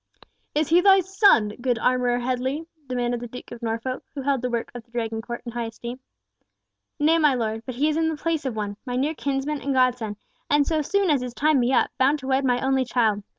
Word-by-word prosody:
"Is 305 0 +1
he 340 +2 +5
thy 390 0 +6
son, 380 - +4
good 245 -2 +1
Armourer 250 +1 +2
Headley?" 255 +5 -2 0.2
demanded 245 -1 -1
the 240 - -6
Duke 250 +2 -10
of 240 - -9
Norfolk, 230 +3 -3
who 275 - -4
held 275 -2 +1
the 250 - -1
work 235 -1 -3
of 245 -1 -8
the 235 - -35
Dragon 225 -2 -3
court 235 +1 -7
in 235 - -5
high 235 0 -3
esteem. 235 +3 -7 1.0
"Nay, 320 +2 +3
my 300 -4 +4
Lord 220 -2 -1
Duke, 225 - -14
but 255 - -5
he 285 +5 +2
is 310 0 0
in 325 0 +2
the 315 - -3
place 325 0 -1
of 260 -4 -3
one, 205 -1 -4
my 245 -2 -4
near 280 +5 0
kinsman 280 0 -2
and 275 -1 -1
godson, 245 -5 +1 0.3
and 290 0 +4
so 315 0 0
soon 385 +3 +1
as 280 -4 +2
his 250 -1 -6
time 305 -1 +3
be 245 +1 +2
up, 265 - +2
bound 275 +3 +4
to 265 -3 -9
wed 265 +1 +2
my 250 -2 +2
only 265 0 +2
child! 225 -4 +1
255 Hz, 240 wpm, -24 LUFS, 240-295 Hz, 1.0 s, thy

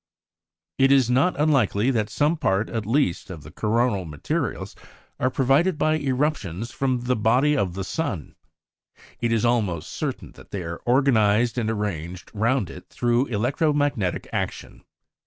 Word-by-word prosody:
It 135 0 +5
is 130 -3 +4
not 140 +7 +2
unlikely 135 -6 +2
that 110 -4 0
some 150 +3 +1
part, 100 -8 0
at 110 -3 -3
least, 115 - 0
of 85 -5 -8
the 75 - -11
coronal 110 +1 0
materials 75 -4 -3 0.4
are 130 - +2
provided 140 +7 +2
by 155 +1 +2
eruptions 130 - -1
from 130 -3 -1
the 125 +1 0
body 125 +7 +3
of 95 -10 -1
the 95 - -3
sun; 115 - -3 0.9
it 120 - 0
is 115 0 +2
almost 105 -9 0
certain - - -4
that - - -16
they 95 -3 -4
are 85 0 -6
organized 120 -3 +3
and 110 -2 -1
arranged 90 -5 -4
round 110 -3 0
it 90 - -12
through 120 +2 +1
electro 135 +8 0
magnetic 145 -11 -1
action. - - -4
120 Hz, 155 wpm, -24 LUFS, 100-135 Hz, 0.9 s, It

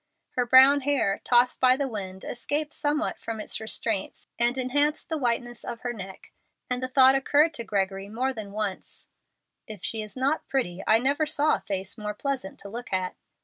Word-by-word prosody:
Her 250 -1 -1
brown 265 +3 +7
hair, 265 -8 0
tossed 245 0 +3
by 255 0 +5
the 280 -1 -1
wind, 190 -5 -6
escaped 295 +5 -2
somewhat 300 +2 -1
from 225 -1 -5
its 210 - -2
restraints 220 -2 -2
and 240 +2 +2
enhanced 290 +5 0
the 320 - -1
whiteness 240 -2 -1
of 235 -1 -6
her 245 -1 -3
neck, 195 -3 -10 0.4
and 250 0 0
the 255 - -1
thought 260 0 +6
occurred 290 +4 +3
to 235 - -4
Gregory 195 -2 -2
more 255 +5 -1
than 215 -4 -7
once, 205 -2 -4 0.6
"If 215 -5 -9
she 220 - -2
is 215 +3 -8
not 275 +4 0
pretty, 195 -10 -2
I 220 - +6
never 280 +6 +1
saw 310 0 +2
a - - 0
face 195 +2 -5
more 210 0 -4
pleasant 265 -5 -3
to 200 - -9
look 235 +4 -7
at." 185 -1 -1
240 Hz, 190 wpm, -26 LUFS, 210-270 Hz, 0.6 s, brown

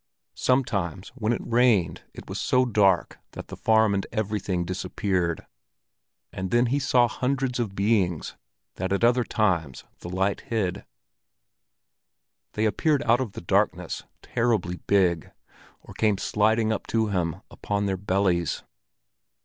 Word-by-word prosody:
Sometimes 100 -8 0
when 115 -3 -2
it 120 - -2
rained 115 -6 +2
it - - -10
was - - -4
so 130 0 +3
dark 100 -6 +2
that - - -9
the - - -6
farm 110 -2 +3
and 100 -1 -1
everything 100 -5 -2
disappeared; 90 -2 -2 0.9
and 95 0 -4
then 120 +5 +3
he 145 - +2
saw 125 -3 +3
hundreds 130 +1 -1
of 105 -5 -2
beings 100 -5 0 0.4
that 95 +1 -3
at 100 +3 0
other 120 +1 +4
times 85 - 0 0.2
the 85 - -8
light 95 +2 0
hid. 100 -5 -2 1.7
They 110 - 0
appeared 145 +7 +1
out 120 +2 +3
of 115 -6 -4
the - - -7
darkness, 85 - 0 0.2
terribly 110 -7 0
big, 90 -5 +2 0.5
or - - -13
came 105 -3 +1
sliding 110 +3 +1
up 110 - -5
to 110 -1 +1
him 85 -5 -1
upon 100 0 -2
their 95 -1 0
bellies. 95 -3 0
105 Hz, 140 wpm, -25 LUFS, 95-115 Hz, 1.7 s, other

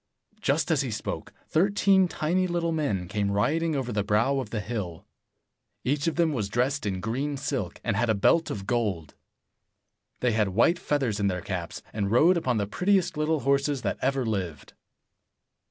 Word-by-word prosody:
Just - - +1
as - - +3
he - - -2
spoke, - - -4 0.2
thirteen 195 +1 +3
tiny 175 +3 0
little 170 -1 -1
men 135 - -1
came 100 +1 -1
riding 155 +11 +1
over 130 -3 -2
the 105 -2 0
brow 115 +7 +2
of 125 -5 -5
the 110 - -3
hill. 100 -7 -5 0.8
Each 145 +4 0
of 165 - 0
them 165 -3 +2
was 105 -7 -2
dressed 125 +4 0
in 95 -2 -2
green 135 +7 -2
silk, 135 - -3
and 105 - 0
had 115 +2 +1
a 110 - +3
belt 160 +11 +3
of 95 -2 -5
gold. 100 - -1 1.1
They 125 - +2
had 105 -2 +1
white 175 +1 +4
feathers 130 -8 0
in 100 - +2
their 90 -2 -1
caps, 90 -4 -5
and 100 -2 -1
rode 155 - +5
upon 130 -8 0
the 100 - 0
prettiest 180 - +1
little 155 0 0
horses 140 0 +1
that 100 - -2
ever 135 -1 +1
lived. 95 -9 -4
125 Hz, 180 wpm, -27 LUFS, 105-155 Hz, 1.1 s, rode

